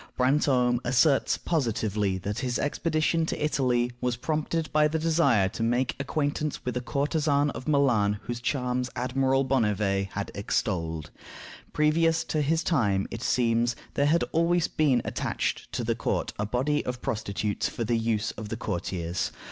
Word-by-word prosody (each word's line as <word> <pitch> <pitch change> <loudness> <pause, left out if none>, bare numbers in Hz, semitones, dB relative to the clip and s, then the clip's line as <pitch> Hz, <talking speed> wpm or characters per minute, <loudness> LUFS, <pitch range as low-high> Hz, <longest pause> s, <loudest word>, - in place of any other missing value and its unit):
Brantome 125 -2 +3
asserts 135 +3 +3
positively 110 - 0
that 100 +3 -4
his 125 -2 -1
expedition 155 +2 0
to - - -2
Italy 125 -4 +1
was 125 -1 0
prompted 155 +2 -2
by 150 0 +5
the 160 +1 -1
desire 155 - +3
to 115 - -7
make 120 +3 +1
acquaintance 145 +1 -2
with 125 -1 -2
a 125 - -1
courtesan 145 +2 +1
of 130 - -8
Milan 120 -9 +2
whose 120 0 -5
charms 125 -1 -1
Admiral 130 +2 +1
Bonnivet 105 -6 +1
had 100 0 -4
extolled. 80 -6 -2 0.6
Previous 160 +2 +2
to 155 - -1
his 160 +3 +1
time, 105 - +1
it 115 - -5
seems, 120 -1 +1 0.2
there 140 - +2
had 165 +3 +3
always 170 +1 +2
been 145 -5 +2
attached - - -2
to - - -2
the - - +1
court - - -2
a 105 - -1
body 135 +6 0
of 125 -1 -5
prostitutes 105 -1 -2
for 115 - -4
the 115 +1 0
use 115 -1 0
of 110 -1 -8
the 115 - -3
courtiers. 90 -4 -3
125 Hz, 155 wpm, -27 LUFS, 110-150 Hz, 0.6 s, by